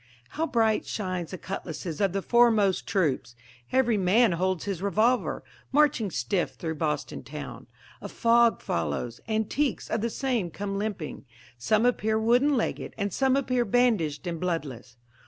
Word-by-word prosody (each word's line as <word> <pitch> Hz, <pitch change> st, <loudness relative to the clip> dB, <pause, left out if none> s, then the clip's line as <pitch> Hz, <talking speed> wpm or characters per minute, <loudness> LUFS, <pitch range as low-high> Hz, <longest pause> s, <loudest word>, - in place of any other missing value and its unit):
How 320 Hz, +2 st, -2 dB
bright 225 Hz, -5 st, +2 dB
shine 185 Hz, -5 st, -3 dB
the 185 Hz, -, -6 dB
cutlasses 170 Hz, -3 st, -5 dB
of 195 Hz, -2 st, +3 dB
the 195 Hz, +1 st, -2 dB
foremost 225 Hz, -5 st, +3 dB
troops! 145 Hz, -10 st, 0 dB, 0.4 s
Every 250 Hz, -4 st, +3 dB
man 205 Hz, +5 st, +4 dB
holds 185 Hz, 0 st, -1 dB
his 195 Hz, -4 st, -3 dB
revolver, 220 Hz, +5 st, +1 dB, 0.3 s
marching 280 Hz, -7 st, +3 dB
stiff 165 Hz, +5 st, -1 dB
through 160 Hz, -1 st, -4 dB
Boston 150 Hz, -2 st, -2 dB
town. -, -, -8 dB, 0.3 s
A -, -, -6 dB
fog 235 Hz, 0 st, +3 dB
follows 85 Hz, -, -3 dB
antiques 220 Hz, +5 st, -1 dB
of 220 Hz, -, 0 dB
the 235 Hz, -, 0 dB
same 235 Hz, -7 st, -1 dB
come 195 Hz, +3 st, -4 dB
limping, 200 Hz, -10 st, -4 dB, 0.3 s
Some 215 Hz, -, +2 dB
appear 220 Hz, -3 st, +1 dB
wooden 250 Hz, +6 st, +3 dB
legged, 230 Hz, -, -3 dB
and 200 Hz, -3 st, -2 dB
some 265 Hz, -1 st, +2 dB
appear 255 Hz, -3 st, +1 dB
bandaged 210 Hz, -10 st, +1 dB
and 170 Hz, -2 st, -3 dB
bloodless. 135 Hz, -9 st, -4 dB
205 Hz, 150 wpm, -27 LUFS, 175-235 Hz, 0.4 s, man